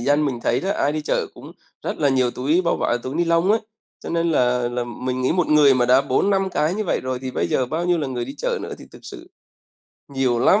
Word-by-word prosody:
dân 145 Hz, +4 st, +2 dB
mình 130 Hz, -5 st, -2 dB
thấy 120 Hz, -, +1 dB
đó, 195 Hz, -, -2 dB
ai 145 Hz, -5 st, 0 dB
đi 155 Hz, -, -2 dB
chợ -, -, -1 dB
cũng -, -, -12 dB, 0.3 s
rất -, -, -4 dB
là 145 Hz, -, +2 dB
nhiều 130 Hz, -2 st, +2 dB
túi 145 Hz, +9 st, +1 dB
bao 170 Hz, -, +1 dB
vải 120 Hz, -, 0 dB
túi 130 Hz, +3 st, -5 dB
ni 175 Hz, -, +1 dB
lông 170 Hz, +3 st, +2 dB
ấy. 220 Hz, +1 st, +3 dB, 0.4 s
Cho -, -, -8 dB
nên 170 Hz, 0 st, 0 dB
là 125 Hz, -4 st, +2 dB
là 120 Hz, 0 st, -3 dB
mình 125 Hz, +1 st, -4 dB
nghĩ 130 Hz, -, +2 dB
một 180 Hz, -1 st, +1 dB
người 150 Hz, -3 st, +5 dB
mà 125 Hz, -1 st, +2 dB
đã 130 Hz, +2 st, +5 dB
4-5 195 Hz, +8 st, +1 dB
cái 160 Hz, 0 st, 0 dB
như 215 Hz, +1 st, -2 dB
vậy -, -, 0 dB
rồi 130 Hz, -1 st, -3 dB
thì 130 Hz, -, -4 dB
bây -, -, -1 dB
giờ 130 Hz, -, +1 dB
bao 160 Hz, +6 st, -2 dB
nhiêu 175 Hz, -1 st, +2 dB
là 145 Hz, -, -2 dB
người 125 Hz, -2 st, -3 dB
đi 135 Hz, +3 st, -8 dB
chợ -, -, -2 dB
nữa -, -, -6 dB
thì -, -, -11 dB
thực -, -, -14 dB
sự -, -, -10 dB, 0.8 s
nhiều 135 Hz, -3 st, 0 dB
lắm. 195 Hz, -, +4 dB
140 Hz, 270 wpm, -21 LUFS, 125-170 Hz, 0.8 s, người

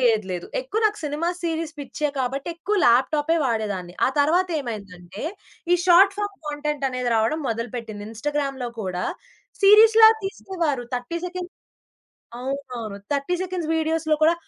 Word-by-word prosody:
లేదు. 225 Hz, -5 st, +3 dB
లేదు. 175 Hz, -1 st, -4 dB
ఎక్కువ -, -, -3 dB
నాకు 420 Hz, 0 st, +2 dB
సినిమా 300 Hz, +4 st, -1 dB
సీరీస్ 325 Hz, -1 st, -2 dB
పిచ్చే 295 Hz, +1 st, -3 dB
కాబట్టి 270 Hz, +4 st, -2 dB
ఎక్కువ 410 Hz, +5 st, -2 dB
ల్యాప్‌టాపె 295 Hz, +7 st, +3 dB
వాడేదాన్ని. 205 Hz, -7 st, -2 dB
ఆ -, -, +3 dB
తరువాత 345 Hz, +6 st, +3 dB
ఏమైందంటే, 195 Hz, -6 st, -8 dB, 0.5 s
ఈ -, -, +8 dB
షార్ట్ 375 Hz, +2 st, +6 dB
ఫార్మ్ 410 Hz, -1 st, -3 dB
కాంటెంట్ 295 Hz, -1 st, -3 dB
అనేది 255 Hz, -1 st, -2 dB
రావడం 225 Hz, +8 st, +1 dB
మొదలుపెట్టింది. 225 Hz, -2 st, -4 dB
ఇన్‌స్టాగ్రామ్‌లో 275 Hz, +1 st, -2 dB
కూడా 185 Hz, -2 st, -3 dB, 0.6 s
సీరీస్‌లా 440 Hz, +2 st, +8 dB
తీసేవారు. 340 Hz, -, -2 dB
30 250 Hz, +8 st, -3 dB
సెకండ్స్ 360 Hz, 0 st, -6 dB, 0.9 s
అవునవును. 250 Hz, -6 st, -5 dB, 0.2 s
30 285 Hz, +5 st, 0 dB
సెకండ్స్ 360 Hz, -3 st, -3 dB
వీడియోస్‌లో 315 Hz, -1 st, +1 dB
కూడా 330 Hz, +2 st, +6 dB
290 Hz, 135 wpm, -23 LUFS, 235-340 Hz, 0.9 s, ఈ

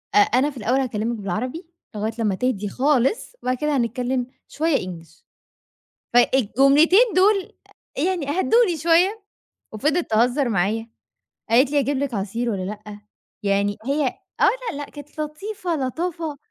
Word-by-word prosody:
أ -, -, +6 dB
أنا 255 Hz, +7 st, +4 dB
في 280 Hz, -, -11 dB
الأول 245 Hz, +4 st, +1 dB
هاكلمك 235 Hz, -2 st, -2 dB
بالعربي، 250 Hz, -, -4 dB, 0.3 s
لغاية 215 Hz, +2 st, -2 dB
لما 210 Hz, -4 st, +1 dB
تهدي 210 Hz, -2 st, -1 dB
خالص 275 Hz, -, +1 dB
وبعد 255 Hz, 0 st, 0 dB
كده 300 Hz, 0 st, 0 dB
هنتكلم 245 Hz, +1 st, -1 dB, 0.2 s
شوية 315 Hz, -1 st, 0 dB
English." 165 Hz, -2 st, -9 dB, 0.9 s
فالجملتين 270 Hz, -, +4 dB, 0.2 s
دول 390 Hz, +1 st, +3 dB, 0.5 s
يعني 360 Hz, -7 st, -1 dB
هدُّوني 445 Hz, -5 st, +3 dB
شوية، 350 Hz, +7 st, +2 dB, 0.5 s
وفضلت 300 Hz, +10 st, 0 dB
تهزر 245 Hz, +4 st, +2 dB
معايا 220 Hz, +3 st, -1 dB, 0.6 s
قالت 255 Hz, +4 st, +4 dB
لي: 295 Hz, -, +2 dB
"أجيب 275 Hz, 0 st, -1 dB
لِك 275 Hz, -4 st, -2 dB
عصير 220 Hz, +5 st, -2 dB
والّا 195 Hz, -4 st, -2 dB
لأ؟" 210 Hz, +1 st, -8 dB, 0.4 s
يعني 200 Hz, 0 st, +1 dB
هي 285 Hz, 0 st, +1 dB, 0.3 s
آه، -, -, +5 dB, 0.3 s
لا، -, -, -7 dB
لأ، 290 Hz, -, -4 dB
كانت 295 Hz, +1 st, -10 dB
لطيفة 350 Hz, +4 st, -4 dB
لطافة. 310 Hz, +3 st, -3 dB
260 Hz, 140 wpm, -22 LUFS, 220-305 Hz, 0.9 s, أ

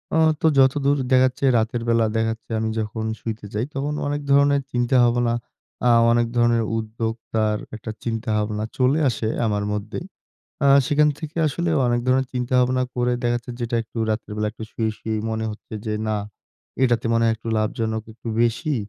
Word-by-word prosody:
আ -, -, +3 dB, 0.2 s
তো -, -, 0 dB
যতদূর 140 Hz, +1 st, +4 dB
দেখা 130 Hz, -, +6 dB
যাচ্ছে 130 Hz, +1 st, -3 dB
রাতের 115 Hz, +1 st, 0 dB
বেলা 115 Hz, -1 st, +3 dB
দেখা 115 Hz, 0 st, +1 dB
যাচ্ছে 115 Hz, +1 st, -9 dB
আমি 110 Hz, 0 st, -1 dB
যখন 110 Hz, +1 st, -3 dB, 0.2 s
শুইতে 110 Hz, -2 st, -5 dB
যাই, 105 Hz, +3 st, -1 dB
তখন 140 Hz, +2 st, -2 dB
অনেক 145 Hz, 0 st, -2 dB
ধরনের 140 Hz, 0 st, +4 dB
চিন্তা-ভাবনা 120 Hz, -1 st, +3 dB, 0.5 s
আ -, -, +6 dB, 0.2 s
অনেক 120 Hz, 0 st, +3 dB
ধরনের 120 Hz, -1 st, +3 dB
উদ্যোগতার 110 Hz, -1 st, -2 dB, 0.2 s
একটা 110 Hz, 0 st, -6 dB
চিন্তা-ভাবনা 110 Hz, -2 st, -1 dB
চলে 135 Hz, +4 st, +3 dB
আসে 115 Hz, -2 st, -2 dB, 0.2 s
আমার 105 Hz, -2 st, 0 dB
মধ্যেই। 105 Hz, -, -4 dB, 0.6 s
আ -, -, +5 dB, 0.2 s
সেখান 150 Hz, +1 st, +4 dB
থেকে 155 Hz, +1 st, -8 dB
আসলেও 165 Hz, +2 st, 0 dB
অনেক 120 Hz, 0 st, +1 dB
ধরনের 130 Hz, +1 st, +3 dB
চিন্তা-ভাবনা 125 Hz, +1 st, +2 dB
করে 125 Hz, 0 st, +1 dB
দেখা 120 Hz, 0 st, +1 dB
যাচ্ছে, 120 Hz, +1 st, -7 dB
যেটা 120 Hz, 0 st, -1 dB
একটু 115 Hz, +1 st, -9 dB
রাতের 110 Hz, 0 st, -3 dB
বেলা 105 Hz, 0 st, 0 dB
একটু 110 Hz, -, -8 dB
শুয়ে, 110 Hz, -1 st, -1 dB
শুয়েই 110 Hz, -1 st, -2 dB
মনে 110 Hz, 0 st, -2 dB
হচ্ছে 105 Hz, -, -12 dB
যে, 105 Hz, -, -1 dB, 0.2 s
"না 110 Hz, -, +1 dB, 0.7 s
এটাতে 120 Hz, -3 st, +2 dB
মনে 115 Hz, -, +2 dB
হয় 115 Hz, -, +3 dB
একটু 115 Hz, -, -8 dB
লাভজনক 110 Hz, 0 st, -1 dB
একটু 115 Hz, -, -9 dB
বেশি। 120 Hz, +6 st, 0 dB
120 Hz, 175 wpm, -23 LUFS, 110-130 Hz, 0.7 s, দেখা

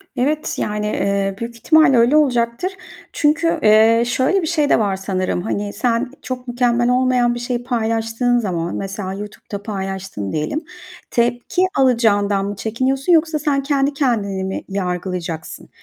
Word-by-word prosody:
Evet 295 Hz, +5 st, -1 dB
yani, 210 Hz, 0 st, -2 dB
eee, 200 Hz, -1 st, -1 dB
büyük 235 Hz, 0 st, -5 dB
ihtimalle 310 Hz, +2 st, +4 dB
öyle 235 Hz, +5 st, +4 dB
olacaktır. 245 Hz, +3 st, +1 dB, 0.4 s
Çünkü, 330 Hz, +2 st, +1 dB
eee, 220 Hz, +2 st, +5 dB
şöyle 260 Hz, +10 st, +1 dB
bir 325 Hz, -, -2 dB
şey 305 Hz, -3 st, +1 dB
de -, -, +4 dB
var 200 Hz, -3 st, +1 dB
sanırım. 190 Hz, -2 st, -2 dB
Hani, 205 Hz, 0 st, -3 dB
sen 235 Hz, +3 st, 0 dB
çok 255 Hz, -1 st, -6 dB
mükemmel 240 Hz, 0 st, +1 dB
olmayan 250 Hz, -1 st, +2 dB
bir -, -, -4 dB
şeyi 240 Hz, 0 st, -3 dB
paylaştığın 230 Hz, 0 st, 0 dB
zaman 175 Hz, -6 st, -2 dB
mesela 195 Hz, -1 st, -4 dB
YouTube'da 205 Hz, 0 st, -8 dB
paylaştın 190 Hz, -, -5 dB
diyelim, 155 Hz, -, -2 dB, 0.5 s
tepki 240 Hz, +8 st, 0 dB, 0.2 s
alacağından 210 Hz, -6 st, +2 dB
mı 205 Hz, +1 st, -4 dB
çekiniyorsun 260 Hz, -, 0 dB
yoksa 320 Hz, -1 st, +3 dB
sen 285 Hz, -2 st, 0 dB
kendi 280 Hz, 0 st, +1 dB
kendini 215 Hz, -9 st, 0 dB
mi 190 Hz, 0 st, -4 dB
yargılayacaksın? 180 Hz, -3 st, -4 dB
235 Hz, 145 wpm, -19 LUFS, 200-260 Hz, 0.5 s, eee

